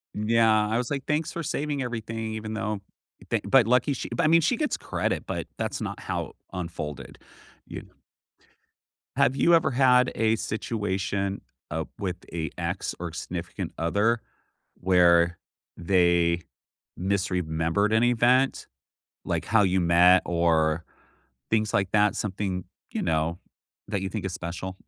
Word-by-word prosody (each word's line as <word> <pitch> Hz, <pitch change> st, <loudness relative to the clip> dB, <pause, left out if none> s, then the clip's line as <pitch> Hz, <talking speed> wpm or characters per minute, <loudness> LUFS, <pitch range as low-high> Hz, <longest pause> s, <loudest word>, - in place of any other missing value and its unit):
Yeah, 110 Hz, 0 st, +3 dB
I 110 Hz, -, +1 dB
was 120 Hz, 0 st, -2 dB
like, 140 Hz, -2 st, -3 dB
"Thanks 150 Hz, +1 st, -1 dB
for 170 Hz, -, -4 dB
saving 145 Hz, -1 st, -2 dB
everything," 115 Hz, -2 st, -4 dB
even 110 Hz, 0 st, -5 dB
though 105 Hz, -1 st, -2 dB, 0.5 s
thank -, -, -1 dB
but 130 Hz, -5 st, +5 dB
lucky 125 Hz, +4 st, +3 dB
she 130 Hz, -, -5 dB
but -, -, +1 dB
I -, -, +4 dB
mean, 165 Hz, +2 st, +6 dB
she 245 Hz, -, +2 dB
gets 300 Hz, +2 st, -1 dB
credit, -, -, -2 dB
but -, -, -3 dB
that's -, -, -3 dB
not -, -, -4 dB
how -, -, -3 dB
it -, -, -17 dB, 0.2 s
unfolded, 85 Hz, -5 st, -6 dB, 0.5 s
you -, -, -7 dB
know. -, -, -20 dB, 1.2 s
Have 130 Hz, +3 st, +3 dB
you 170 Hz, -, +5 dB
ever 165 Hz, -4 st, +2 dB
had 125 Hz, -1 st, +4 dB
a 110 Hz, 0 st, +2 dB
situation, 100 Hz, -3 st, -2 dB, 0.3 s
uh, 80 Hz, +1 st, -2 dB
with 95 Hz, -3 st, -3 dB, 0.2 s
a 80 Hz, -3 st, -2 dB
ex -, -, -3 dB
or 85 Hz, -2 st, -5 dB
significant 85 Hz, +2 st, -5 dB
other, 105 Hz, +8 st, +1 dB, 0.6 s
where 85 Hz, -2 st, +4 dB, 0.4 s
they 85 Hz, -1 st, +2 dB, 0.6 s
misremembered 90 Hz, 0 st, 0 dB
an 110 Hz, -, +4 dB
event, 125 Hz, +2 st, +3 dB, 0.6 s
like -, -, -2 dB
how 110 Hz, +2 st, +4 dB
you 95 Hz, -1 st, +2 dB
met 90 Hz, +1 st, +6 dB
or 85 Hz, -2 st, +2 dB, 0.7 s
things 110 Hz, -1 st, +2 dB
like 95 Hz, -1 st, +1 dB
that 105 Hz, -1 st, +3 dB
something, 95 Hz, -3 st, -3 dB, 0.3 s
you -, -, -2 dB
know, 80 Hz, +1 st, 0 dB, 0.5 s
that 100 Hz, -2 st, -1 dB
you 95 Hz, -, -3 dB
think 105 Hz, -3 st, -4 dB
is 95 Hz, -, -3 dB
special? 90 Hz, +2 st, -5 dB
100 Hz, 150 wpm, -26 LUFS, 85-115 Hz, 1.2 s, mean